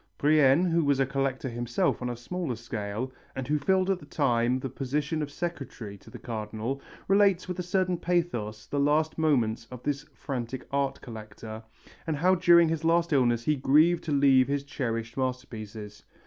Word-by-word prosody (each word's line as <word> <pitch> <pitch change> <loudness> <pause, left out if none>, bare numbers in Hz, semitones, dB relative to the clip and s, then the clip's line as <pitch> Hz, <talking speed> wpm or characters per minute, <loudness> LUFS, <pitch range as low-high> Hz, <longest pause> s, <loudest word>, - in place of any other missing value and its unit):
] - - -46
Brienne, 150 +2 +4
who 170 -1 +2
was 140 -2 +2
a 135 - +4
collector 135 -1 -2
himself 120 0 -1
on 125 - -2
a 120 - -4
smaller 155 +2 -3
scale, 115 +1 -4 0.2
and 130 -1 -4
who 150 +1 +1
filled 185 +5 +2
at 190 - 0
the 145 - -14
time 125 -4 +1
the 135 - -4
position 140 +4 -2
of 150 - -3
secretary 135 -10 -5
to - - -16
the - - -9
Cardinal, 110 +3 -4 0.3
relates 195 -2 +3
with 180 0 -4
a - - +1
certain 185 0 0
pathos 120 -12 -1
the 145 - -2
last 155 +3 +2
moments 120 -8 +1
of 125 -1 -9
this 145 0 -2
frantic 125 -1 -5
art 140 -1 0
collector, 110 -1 -9 0.5
and 160 - 0
how 180 +5 +4
during 170 -2 +6
his 160 0 -2
last 165 0 +2
illness 120 -4 +3
he 150 +4 +2
grieved 150 +6 +4
to 160 - -2
leave 135 -2 +5
his 140 0 -1
cherished 115 -5 -4
masterpieces. 110 -5 -5
135 Hz, 185 wpm, -28 LUFS, 120-160 Hz, 0.5 s, during